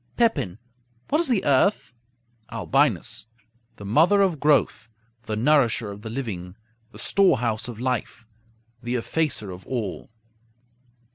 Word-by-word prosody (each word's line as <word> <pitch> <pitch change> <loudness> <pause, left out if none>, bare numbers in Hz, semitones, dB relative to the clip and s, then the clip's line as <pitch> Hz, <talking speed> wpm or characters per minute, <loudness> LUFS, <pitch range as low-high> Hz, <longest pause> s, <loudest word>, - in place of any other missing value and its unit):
Pepin 165 - +1 0.5
What 305 +3 +2
is 340 - +4
the 235 -7 +1
earth? 140 +2 +2 0.6
Albinus - - 0 0.5
The 100 - -10
mother 170 - +4
of 175 -6 0
growth; 145 -6 +2 0.4
the 110 - -2
nourisher 120 -3 +2
of 100 +1 -10
the 110 - -7
living; 100 -8 -5 0.4
the - - -13
storehouse 120 - +1
of 120 -3 -8
life; 125 -2 -3 0.6
the 120 +1 -3
effacer 125 -5 -1
of 90 +1 -11
all. 115 -7 -4
120 Hz, 125 wpm, -24 LUFS, 110-155 Hz, 0.6 s, is